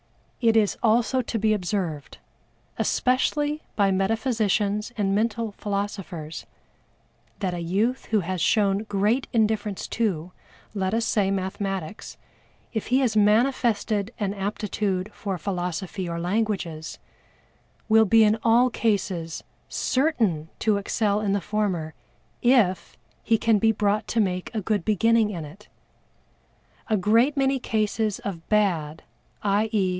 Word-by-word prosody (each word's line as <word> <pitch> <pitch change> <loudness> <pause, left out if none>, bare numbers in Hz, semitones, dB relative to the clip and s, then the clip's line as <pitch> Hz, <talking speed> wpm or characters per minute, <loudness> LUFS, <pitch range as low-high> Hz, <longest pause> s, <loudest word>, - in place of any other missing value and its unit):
It 225 -2 +4
is 210 -2 +3
also 235 +3 +2
to 230 -1 -3
be 215 0 +2
observed, 180 -7 -3 0.6
especially 295 +4 +1
by 200 -2 +3
metaphysicians 210 +1 0
and 195 -2 +1
mental 225 +1 0
philosophers, 195 -6 -5 0.9
that 185 -3 -2
a 175 - -4
youth 205 +10 0
who 215 -2 +1
has 185 0 -3
shown 200 +1 +3
great 210 +5 +1
indifference 215 -3 0
to, 185 -7 -1 0.4
let 195 0 -1
us 230 0 0
say 200 -3 +1
mathematics, 195 -1 -4 0.6
if 220 - -3
he 255 +3 +3
has 245 -5 +1
manifested 215 -1 +2
an 200 -2 -1
aptitude 200 -1 -2
for 195 -3 -4
philosophy 180 +1 -3
or 170 0 -3
languages, 180 -4 -2 0.9
will 220 0 +5
be 225 +2 +5
in 215 +1 +3
all 240 +2 +4
cases 190 -8 -1 0.3
certain 225 - 0
to 215 -2 +1
excel 205 +1 0
in 200 -2 0
the 200 - +1
former, 190 -6 -2 0.5
if 205 - +2 0.2
he 225 - +2
can 220 -1 +2
be 225 +2 +4
brought 210 0 0
to 235 - 0
make 185 -3 0
a 215 - 0
good 205 -2 -1
beginning 225 +1 +3
in 170 -6 -5
it. 195 +9 -14 1.2
A 215 - +3
great 230 +9 +3
many 270 0 +2
cases 215 -2 -1
of 175 -5 -7
bad, 170 -8 +1 0.4
_i. 210 +2 +1
e. 215 -3 +2
210 Hz, 130 wpm, -25 LUFS, 190-225 Hz, 1.2 s, will